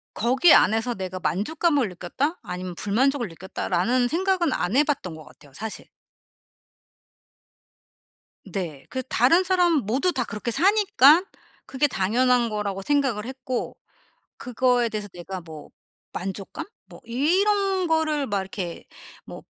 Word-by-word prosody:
거기 260 +9 +4
안에서 225 +3 +3
'내가 185 -2 -5
만족감을 245 - 0
느꼈다. 260 - -3
아니면 180 0 -6
불만족을 240 +6 0
느꼈다.' 175 +3 -6
라는 240 +8 +2
생각은 355 +1 0
안 180 +6 -1
해 285 - +5
봤던 280 - -2
것 155 - -11
같아요 145 - -18
사실. 220 +7 -7 2.6
네. 165 -9 -5
그 260 - -3
다른 300 +13 +3
사람 360 -2 +2
모두 270 - +1
다 260 - 0
그렇게 215 +1 -5
사니까 370 - +5 0.4
그게 275 +2 +1
당연한 240 +3 +2
거라고 200 -2 -3
생각을 270 -5 0
했고 255 -1 -4 0.6
그거에 245 0 +1
대해서 210 -2 -5
내가 180 +1 -7
뭐 160 -3 -11 0.4
만족감 190 +1 -6 0.2
뭐 - - -14
이런 380 - +1
거를 310 -3 +1
막 200 -4 -1
이렇게 185 -2 -6 0.4
뭐 - - -10
245 Hz, 275 characters per minute, -24 LUFS, 195-300 Hz, 2.6 s, 해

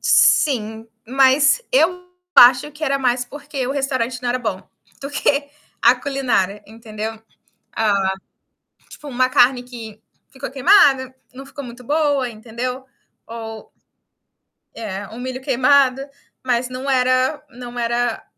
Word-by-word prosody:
Sim. 225 -5 +2 0.2
Mas 270 - +4
eu 360 -4 +2 0.3
acho 250 +4 +7
que 305 +1 -5
era 275 -1 0
mais 250 -1 0
porque 280 -1 -6
o 270 - -2
restaurante 255 -3 -2
não 245 - -2
era 250 +1 0
bom, 200 -5 -4 0.4
do 275 +1 -6
que 285 0 0 0.3
a 235 +2 +6
culinária, 245 -7 -1
entendeu? 220 0 -7 0.5
Ah, 200 -3 +1 0.8
tipo 295 - -12
uma 255 -1 +1
carne 250 0 +3
que 225 -3 -10 0.3
ficou 265 0 -8
queimada, 270 -4 +4 0.2
não 270 +1 -10
ficou 280 +1 -9
muito 245 0 -11
boa, 285 -2 0
entendeu, 245 +4 -6 0.4
ou 225 -1 -9 1.0
É, 200 -3 -6
um 220 - -10
milho 255 +1 -5
queimado, 265 0 +3 0.4
mas 245 0 0
não 255 +2 -5
era 255 +3 +1
não 245 0 -9
era, 235 0 -1
255 Hz, 130 wpm, -20 LUFS, 230-275 Hz, 1.0 s, acho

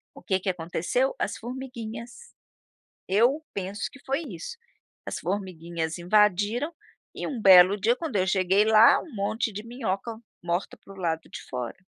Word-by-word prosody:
O - - -13
que 190 -3 +1
que 190 +1 -2
aconteceu? 180 +9 -1
As - - -2
formiguinhas. 240 - -8 0.7
Eu 245 +10 +3
penso 195 +1 -5
que 275 - -15
foi 275 +4 -1
isso, 475 +8 -7 0.5
as - - -4
formiguinhas 170 -4 -3
invadiram 210 - +2 0.4
e - - -4
um 260 -6 -4
belo 190 -1 +8
dia, 230 +5 +2
quando 320 -10 -4
eu 185 -1 +2
cheguei 190 +1 +3
lá, 220 +1 +7
um 315 - -12
monte 215 +3 -1
de 205 +1 -6
minhoca 230 -2 -3 0.2
morta 175 +2 -2
para 195 - -15
o - - -16
lado 165 -3 -2
de - - -8
fora. 125 -2 -4
205 Hz, 160 wpm, -26 LUFS, 185-240 Hz, 0.7 s, belo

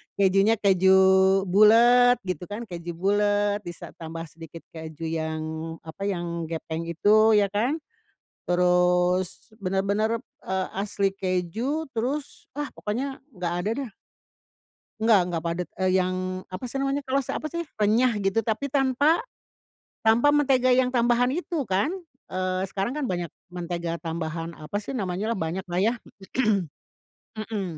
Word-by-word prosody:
Kejunya 195 +2 +4
keju 190 -1 +4 0.6
bulat 240 +5 +6
gitu 180 -2 -4
kan, 205 +4 -6
keju 175 -1 -6
bulat 205 +3 +1
bisa 175 -1 -8
tambah 165 0 -6
sedikit 165 +1 -11
keju 160 0 -8
yang, 160 -1 -2 0.4
apa, 165 +5 -7
yang 170 -3 -3
gepeng 160 0 -4
itu 215 +6 +4
ya 205 -1 +3
kan, 245 +11 0 0.7
terus 180 +2 +2
benar-benar, 200 +4 0 0.3
eee, 190 0 -1
asli 200 -1 0
keju, 195 - -2
terus 265 +6 -4
ah, 295 -1 -2
pokoknya 260 +6 -4 0.2
enggak 175 -1 -2
ada 210 - 0 0.2
dah. 215 - -13 1.1
Enggak 220 -3 +5
enggak 170 -2 -2
padat, 170 +1 -2
eee, 185 0 +2
yang 185 0 +1 0.4
apa 185 +6 -6
sih 270 - -6
namanya, 275 +1 0
kres 270 0 0
apa - - -3
sih, 340 +1 -4 0.2
renyah 230 +4 +4
gitu, 195 +3 +1
tapi 225 +6 -1
tanpa 280 - +2 0.8
tanpa 230 +6 +5
mentega 270 -3 +3
yang 250 0 +3
tambahan 240 +1 +3
itu 330 -4 -2
kan, 195 - +1 0.4
eee, 185 0 -1
sekarang 200 +6 -2
kan 300 - -1
banyak 175 -1 -2 0.2
mentega 170 -1 -3
tambahan, 165 0 -4
apa 155 +6 -5
sih 215 - -7
namanyalah, 200 +2 -2
banyaklah 175 0 -3
ya. 225 +4 +3 1.4
Mhm, 205 -6 -4
195 Hz, 135 wpm, -25 LUFS, 175-240 Hz, 1.4 s, bulat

